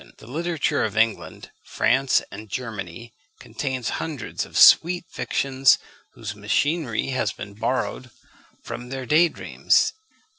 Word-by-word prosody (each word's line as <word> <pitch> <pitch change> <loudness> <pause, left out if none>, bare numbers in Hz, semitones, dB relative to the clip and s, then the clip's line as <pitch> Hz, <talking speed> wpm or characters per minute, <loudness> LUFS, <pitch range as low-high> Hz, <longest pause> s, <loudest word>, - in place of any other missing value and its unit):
The - - -15
literature 155 +2 -1
of 110 -1 -3
England, 110 0 -1
France, 135 -1 +2
and 110 0 -10
Germany 110 -2 -6 0.3
contains 130 -4 -4
hundreds 155 -5 -4
of - - -6
sweet 175 +1 +6
fictions, 135 0 +2 0.4
whose 105 -3 -6
machinery 120 +5 -1
has 130 -1 -1
been 100 - -9
borrowed 125 +3 -2 0.5
from 125 +1 -7
their 130 -1 -5
day 160 +7 +4
dreams. - - +1
130 Hz, 120 wpm, -23 LUFS, 110-145 Hz, 0.5 s, sweet